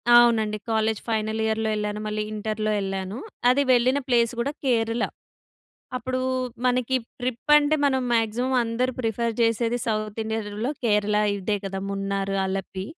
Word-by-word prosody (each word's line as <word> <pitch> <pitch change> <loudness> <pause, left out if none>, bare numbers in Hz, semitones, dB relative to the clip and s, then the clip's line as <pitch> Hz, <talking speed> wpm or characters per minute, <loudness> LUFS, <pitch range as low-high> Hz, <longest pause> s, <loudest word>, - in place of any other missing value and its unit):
అవునండి. 225 -3 +5
College 220 -1 +1
final 220 0 0
ఇయర్‍లో 220 0 0
వెళ్ళాను. 210 0 -2
మళ్ళీ 210 0 -1
ఇంటర్‍లో 215 0 -2
ఎళ్ళాను. 195 +2 -3 0.3
అది 280 +3 +4
వెళ్ళిన 255 +3 +4
ప్లేస్ 235 -2 +3
కూడా 275 +4 0
కేరళ. 230 -1 +1 0.9
అప్పుడూ 255 0 -2 0.5
మనకి 250 +1 +2 0.2
ట్రిప్ 250 +3 -3
అంటే 295 +1 +3
మనం 265 -2 +3
మాక్సిమమ్ 235 +3 +1
అందరు 245 +3 -1
ప్రిఫర్ 230 0 -1
చేసేది 230 +1 +1
సౌత్ 215 -1 -2
ఇండియలో 220 +2 -3
కేరళ 210 -1 +2 0.2
ఇదే 200 +2 -1
కదా! 195 0 -3
మున్నారు, 195 0 -2
అలపి. 190 0 -4
220 Hz, 135 wpm, -25 LUFS, 210-245 Hz, 0.9 s, అవునండి